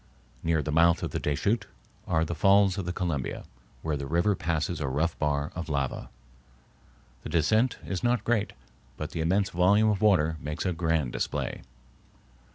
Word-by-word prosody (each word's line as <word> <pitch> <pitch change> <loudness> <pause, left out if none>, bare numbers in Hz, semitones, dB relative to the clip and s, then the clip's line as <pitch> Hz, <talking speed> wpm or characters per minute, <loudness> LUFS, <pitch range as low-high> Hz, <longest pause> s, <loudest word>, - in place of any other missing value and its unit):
Near 80 -2 +1
the 75 - -3
mouth 85 +2 +4
of - - -2
the - - -2
Deschutes 100 +9 0 0.4
are 80 -2 +2
the 85 - -3
Falls 100 +3 +4
of 95 - -3
the 90 - -2
Columbia, 85 -8 -3 0.4
where 80 -2 -1
the 70 -1 -4
river 85 +7 +2
passes 80 -1 -2
a 70 - -1
rough 75 +5 0
bar 75 +1 0
of 85 -1 -6
lava. 70 -3 -2 1.1
The - - -7
descent 110 +10 +2
is 95 -2 -4
not 120 0 +2
great, 115 -3 0 0.4
but - - -5
the 80 - -3
immense 95 +5 +1
volume 100 +5 +4
of 100 - -2
water 80 -7 +3
makes 75 +3 -4
a 90 - +1
grand 80 -6 0
display. - - -3
85 Hz, 170 wpm, -28 LUFS, 75-100 Hz, 1.1 s, mouth